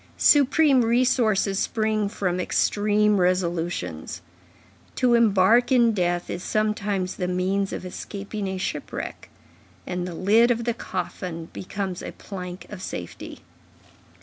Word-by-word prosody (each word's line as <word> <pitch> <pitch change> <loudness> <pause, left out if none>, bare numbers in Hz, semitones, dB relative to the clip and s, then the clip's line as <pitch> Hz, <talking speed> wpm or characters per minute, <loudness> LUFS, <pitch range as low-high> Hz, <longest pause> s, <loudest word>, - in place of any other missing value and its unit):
Supreme 285 -2 +5
resources 225 -4 +2
spring 215 -2 0
from 180 -3 -2
extreme 210 +2 +2
resolutions. 175 - -1 0.7
To 250 -2 +3
embark 230 +2 +4
in 240 -3 +5
death 175 -3 0
is 175 - -5
sometimes 205 -3 -1
the 180 - -2
means 190 +2 0
of - - -5
escaping 200 +2 -6
a 190 0 -3
shipwreck; 185 - -5 0.6
and 180 0 -3
the 175 - -6
lid 220 +7 +4
of 235 -1 +1
the 235 0 0
coffin 180 -5 -5
becomes 190 -1 -4
a - - -7
plank 180 -2 -8
of 205 -3 -8
safety. 90 - -7
195 Hz, 120 wpm, -24 LUFS, 180-220 Hz, 0.7 s, Supreme